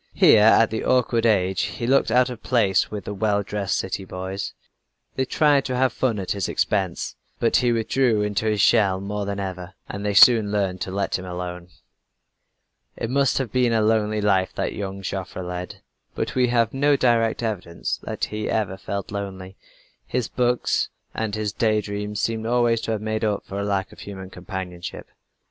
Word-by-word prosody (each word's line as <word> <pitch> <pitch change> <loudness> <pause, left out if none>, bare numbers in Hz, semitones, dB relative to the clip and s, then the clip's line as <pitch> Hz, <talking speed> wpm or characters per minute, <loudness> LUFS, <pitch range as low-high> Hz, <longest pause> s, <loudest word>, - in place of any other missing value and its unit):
Here 110 - +6
at 110 +1 +5
the 110 - -2
awkward 120 -2 +2
age 95 -3 +2
he 120 - -3
looked 135 0 +3
out 125 +2 +3
of 120 - -8
place 110 -7 +2
with 105 -3 -6
the 105 - -4
well 100 0 +1
dressed 100 -1 -2
city 95 +1 -3
boys. 95 +1 -5 0.6
They 130 - 0
tried 145 0 +3
to 130 - -2
have 130 -1 +2
fun 120 -5 0
at 95 -2 -4
his 100 -2 -1
expense, 95 -5 -1 0.2
but - - +3
he 120 -1 +2
withdrew 115 -1 +1
into 105 +1 -1
his 105 -2 +1
shell 100 -5 +4
more 100 +1 -4
than 100 0 -3
ever, 95 -1 -6
and 100 +1 -6
they 105 -1 -1
soon 110 -1 +7
learned 95 -3 -1
to 95 - -3
let 100 0 -1
him 95 - -8
alone. 90 -1 -6 1.3
It 115 - -3
must 140 0 +2
have 135 -4 -2
been 125 -2 +2
a 110 - +3
lonely 110 -1 +1
life 95 -2 +2
that - - -2
young 95 -1 -5
Joffre 95 -1 -4
led 90 0 -6 0.3
but - - -2
we 125 -1 +3
have 115 -2 +1
no 145 +2 +3
direct 120 -3 +2
evidence 95 -7 -3
that - - -3
he 105 0 -4
ever 100 -4 -1
felt 100 +1 -5
lonely. 95 -2 -6 0.5
His 125 -1 -1
books 125 -1 0 0.2
and 110 -2 -2
his 105 -1 -2
day 110 -2 +2
dreams 105 0 -4
seem 110 0 -1
always 120 -1 +2
to - - -3
have 105 - -3
made 110 0 -2
up 105 -2 -1
for 100 - -5
a - - -1
lack 100 -1 -1
of - - -15
human 95 -2 -8
companionship. 90 -2 -7
105 Hz, 190 wpm, -23 LUFS, 95-115 Hz, 1.3 s, soon